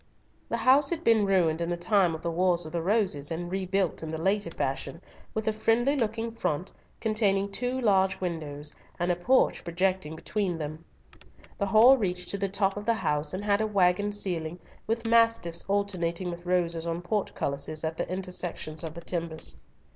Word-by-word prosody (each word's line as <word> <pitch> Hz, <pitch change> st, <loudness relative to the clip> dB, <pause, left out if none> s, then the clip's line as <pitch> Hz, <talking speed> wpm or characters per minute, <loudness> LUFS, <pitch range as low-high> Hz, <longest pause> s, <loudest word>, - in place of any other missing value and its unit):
The -, -, 0 dB
house 275 Hz, +2 st, +4 dB
had 335 Hz, -1 st, -2 dB
been 220 Hz, -3 st, +4 dB
ruined 170 Hz, -4 st, +2 dB
in 170 Hz, -, -1 dB
the 175 Hz, -, -1 dB
time 180 Hz, -2 st, +2 dB
of 160 Hz, -, -9 dB
the 170 Hz, -, -1 dB
Wars 175 Hz, 0 st, +2 dB
of 155 Hz, -, -7 dB
the 170 Hz, -, -2 dB
Roses, 185 Hz, -7 st, +2 dB
and 175 Hz, +2 st, -4 dB
rebuilt 190 Hz, -1 st, -1 dB
in 160 Hz, -, -5 dB
the 160 Hz, -, -3 dB
later 200 Hz, +4 st, +1 dB
fashion, -, -, -3 dB, 0.4 s
with 220 Hz, 0 st, -2 dB
a 220 Hz, -, +2 dB
friendly 230 Hz, +5 st, +2 dB
looking 225 Hz, -2 st, -1 dB
front, 185 Hz, -6 st, -2 dB, 0.3 s
containing 200 Hz, -3 st, +1 dB
two 250 Hz, +5 st, -2 dB
large 195 Hz, -5 st, +2 dB
windows, 150 Hz, -5 st, -3 dB, 0.2 s
and 175 Hz, +1 st, +1 dB
a -, -, +1 dB
porch 250 Hz, +10 st, +2 dB
projecting 180 Hz, -1 st, -1 dB
between 185 Hz, +1 st, -2 dB
them. 155 Hz, +1 st, -6 dB, 0.8 s
The 200 Hz, -, 0 dB
hall 230 Hz, +6 st, +7 dB
reached 180 Hz, -3 st, -2 dB
to 200 Hz, -, -1 dB
the 195 Hz, 0 st, 0 dB
top 195 Hz, 0 st, 0 dB
of 205 Hz, +1 st, -6 dB
the 230 Hz, -, +4 dB
house, 150 Hz, -7 st, -1 dB
and 190 Hz, +3 st, -4 dB
had 205 Hz, 0 st, +2 dB
a 220 Hz, -, +1 dB
waggon 200 Hz, 0 st, +2 dB
ceiling, 175 Hz, -5 st, -2 dB, 0.3 s
with 230 Hz, +1 st, -1 dB
mastiffs 230 Hz, -7 st, +2 dB
alternating 185 Hz, -3 st, -1 dB
with 175 Hz, +1 st, -9 dB
roses 170 Hz, -2 st, 0 dB
on 170 Hz, +1 st, -3 dB
portcullises 155 Hz, -6 st, -2 dB
at 160 Hz, 0 st, -2 dB
the -, -, -3 dB
intersections 180 Hz, -4 st, -4 dB
of 160 Hz, -1 st, -6 dB
the 170 Hz, -, -7 dB
timbers. 165 Hz, -2 st, -3 dB
185 Hz, 185 wpm, -28 LUFS, 170-210 Hz, 0.8 s, hall